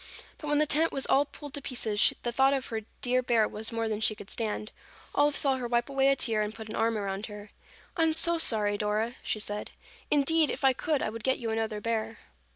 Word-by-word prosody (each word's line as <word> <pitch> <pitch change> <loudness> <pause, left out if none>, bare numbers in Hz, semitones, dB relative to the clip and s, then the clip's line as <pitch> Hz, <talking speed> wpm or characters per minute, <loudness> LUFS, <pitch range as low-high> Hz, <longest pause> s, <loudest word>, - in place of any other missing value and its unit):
But 300 - -7
when 295 0 +1
the 305 - +3
tent 315 +2 +2
was 270 - -1
all 280 +2 +3
pulled 290 0 -11
to 285 - -4
pieces, 225 -6 +2
the 240 - -1
thought 270 +3 +3
of 265 -1 -3
her 225 -1 -3 0.2
dear 255 +1 +2
bear 230 -3 +2
was 220 +1 -5
more 230 0 -2
than 215 -1 -2
she 215 -1 +2
could 205 -1 -9
stand. 215 -1 -3 0.4
Olive 290 0 +2
saw 270 -2 +4
her 250 -2 -4
wipe 240 +1 0
away 270 -1 +2
a 275 - +4
tear 225 -5 0
and 210 +1 -3
put 220 -1 -9
an 215 - -5
arm 225 0 +1
around 200 0 -4
her. 210 -1 -10 0.4
"I 335 - -1
am 325 -1 +3
so 335 +1 +6
sorry, 205 -7 +3
Dora," 215 +3 -1
she - - -2
said. 210 0 -3 0.4
"Indeed, 300 +2 +3
if 285 - -2
I 265 - +5
could, 295 +2 -1
I - - -2
would 225 0 -8
get 260 +2 +1
you 230 -2 -4
another 220 -1 -2
bear." 225 0 -3
230 Hz, 245 wpm, -28 LUFS, 215-275 Hz, 0.4 s, so